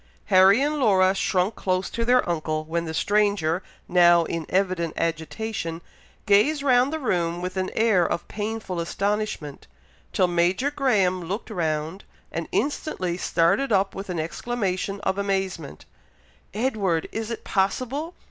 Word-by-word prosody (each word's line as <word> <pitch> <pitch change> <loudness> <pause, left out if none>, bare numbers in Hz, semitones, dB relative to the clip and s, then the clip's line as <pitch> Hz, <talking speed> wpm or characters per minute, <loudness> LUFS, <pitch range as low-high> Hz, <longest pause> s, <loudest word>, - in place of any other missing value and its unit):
Harry 190 +4 +7
and 300 +1 0
Laura 190 -6 +4
shrunk 190 +1 0
close 185 -1 -1
to 230 - -3
their 250 +2 +3
uncle, 155 -2 -1
when 170 +2 -2
the 160 - -4
stranger, 200 -4 +1 0.3
now 175 -1 +5
in 165 -1 -4
evident 180 -4 0
agitation, 165 +1 -3 0.5
gazed 275 +9 +3
round 255 0 +4
the 315 - -2
room 175 - -1
with 180 +1 -4
an 185 0 -1
air 220 -5 +3
of 170 - -2
painful 210 -4 -4
astonishment, 200 -4 -3 0.4
till 185 - +3
Major 180 +10 +1
Graham 195 -11 +1
looked 195 +6 -5
round, 160 +2 -2 0.3
and - - -4
instantly 230 - -1
started 180 +9 +1
up 195 -1 +2
with 195 0 -7
an 175 -2 -2
exclamation 195 +2 -2
of 190 +1 -1
amazement, 190 - -3 0.7
"Edward! 205 -7 0
is 225 0 -4
it 230 - -5
possible! 255 - -1
190 Hz, 140 wpm, -24 LUFS, 170-220 Hz, 0.7 s, Harry